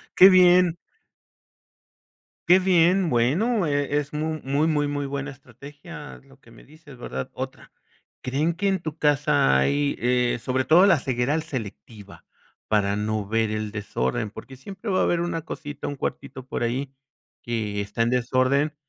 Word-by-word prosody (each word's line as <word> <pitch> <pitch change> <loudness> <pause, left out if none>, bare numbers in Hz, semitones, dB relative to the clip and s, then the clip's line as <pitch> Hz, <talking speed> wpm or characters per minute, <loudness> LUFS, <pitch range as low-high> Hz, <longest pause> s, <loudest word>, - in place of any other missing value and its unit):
Qué 190 - +9
bien. 180 -2 +5 1.7
Qué 180 +2 +7
bien. 180 0 +3
Bueno, 170 - +1
e 145 0 0
es 145 0 -6
mu 155 +1 -3
muy, 140 +4 +1
muy, 150 -2 +1
muy 145 0 -3
buena 140 +1 -4
estrategia, 145 - -12
lo 135 0 -21
que 115 - -19
me 115 - -17
dices, 150 -2 -16
¿verdad? 65 - -6
Otra - - -7 0.5
¿Creen 145 +6 -1
que 190 +4 -2
en 190 -1 +1
tu 155 -1 -6
casa 140 - +2
hay, 140 - +1
eh, 125 0 +1
sobre 130 0 -1
todo 175 +4 +6
la 190 -6 +4
ceguera 130 +1 -1
al 160 - -2
selectiva, 110 -7 -9 0.4
para 100 -1 +1
no 105 0 -2
ver 110 +2 0
el 110 -1 -3
desorden? 105 - -3
Porque 130 +5 -11
siempre 195 - -8
va 185 - +1
a - - +3
haber 170 - +1
una 170 -2 -3
cosita, 145 -2 -7
un 145 - -4
cuartito 130 -1 -6
por 130 - -4
ahí, 130 +4 -2 0.5
que 110 -3 -3
está 100 +2 -3
en 115 - +2
desorden, 130 +4 +1
140 Hz, 165 wpm, -24 LUFS, 120-160 Hz, 1.7 s, Qué